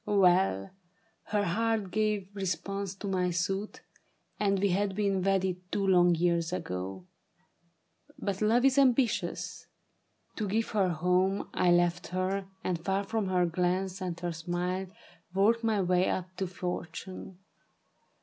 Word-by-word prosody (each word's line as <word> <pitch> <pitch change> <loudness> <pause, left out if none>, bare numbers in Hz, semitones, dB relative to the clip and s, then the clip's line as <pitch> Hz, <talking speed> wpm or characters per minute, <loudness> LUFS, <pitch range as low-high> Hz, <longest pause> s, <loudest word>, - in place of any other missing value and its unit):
" - - -44
Well, 185 - +3 0.5
her 210 -1 0
heart 215 +1 0
gave 210 -2 -1
response 195 +1 -3
to 200 +1 -6
my 185 -2 +1
suit, 190 +4 -2 0.6
And 200 -1 +2
we 200 +1 +2
had 195 +1 0
been 200 -2 +1
wedded 190 -1 +1
two 200 -1 0
long 175 -2 +5
years 170 0 +1
ago; 95 - -4 1.1
But 200 -1 -3
love 230 +4 +3
is 270 +1 +5
ambitious. 250 -3 +1 0.7
To 215 - -1
give 220 +4 0
her 205 -3 +2
a 180 - 0
home 180 +4 +1
I 180 - +2
left 175 0 +2
her, 190 +1 -2 0.2
and 170 -3 -2
far 195 +1 0
from 215 0 -2
her 180 -1 +2
glance 180 +2 -1
and 175 -2 -3
her 175 -1 -1
smile, 175 +3 -2
• - - -20 0.4
Worked 225 +4 +3
my 220 -2 +2
way 180 0 +2
up 185 0 -3
to 190 - -1
fortune. 180 +1 -6
190 Hz, 150 wpm, -30 LUFS, 175-200 Hz, 1.1 s, long